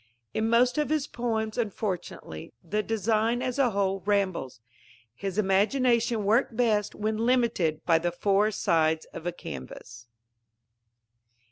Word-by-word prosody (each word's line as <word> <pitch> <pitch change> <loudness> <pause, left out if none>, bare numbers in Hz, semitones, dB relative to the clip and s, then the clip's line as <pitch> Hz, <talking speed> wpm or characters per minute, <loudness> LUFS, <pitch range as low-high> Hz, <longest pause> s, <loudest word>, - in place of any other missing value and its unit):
In 220 +1 0
most 245 +4 +3
of 300 - 0
his 305 -2 +1
poems, 220 -2 -2
unfortunately, 190 - -4
the 210 +5 -1
design, 225 +3 0
as 255 +1 -2
a 260 -3 +4
whole, 195 -2 0
rambles. 190 - -1 0.5
His 195 - -5
imagination 225 +3 +2
worked 225 +3 +2
best 215 -4 +1
when 215 +1 -2
limited 225 -10 +1
by 165 -2 +4
the 175 +1 -1
four 200 +4 +2
sides 160 -6 +1
of 165 - -6
a - - 0
canvas. 115 - -9
210 Hz, 130 wpm, -27 LUFS, 180-235 Hz, 0.5 s, a